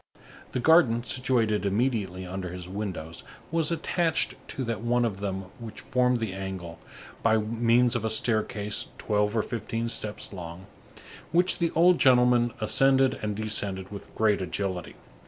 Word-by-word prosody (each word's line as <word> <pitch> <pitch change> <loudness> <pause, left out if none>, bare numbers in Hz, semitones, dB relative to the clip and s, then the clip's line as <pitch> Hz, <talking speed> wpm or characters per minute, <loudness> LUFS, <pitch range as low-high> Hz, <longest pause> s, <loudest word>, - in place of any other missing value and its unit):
The - - 0
garden 125 -5 +4
situated 120 -4 +1
immediately 100 -3 -1
under 90 0 -5
his 90 -1 -7
windows 95 -5 -5 0.3
was 165 -1 +1
attached 165 0 0
to 135 - -4
that 115 -3 -3
one 120 +1 +1
of 100 -4 -3
them 95 -1 -3
which 115 -2 -8
formed 125 0 +1
the 110 -4 -3
angle, 95 -4 -6 0.4
by 110 -1 +3
means 115 +3 +2
of 120 - -1
a 110 - 0
staircase 110 -2 +1
twelve 105 +1 0
or 110 - +2
fifteen 115 0 -3
steps 105 -2 -5
long, 90 0 -8 0.7
which 180 +2 +2
the 170 -1 +2
old 175 +2 +5
gentleman 125 -2 +4
ascended 135 +4 +3
and 105 -1 -2
descended 100 -3 -2
with 100 - -10
great 110 -3 +2
agility. 95 -1 -3
110 Hz, 150 wpm, -27 LUFS, 100-125 Hz, 0.7 s, old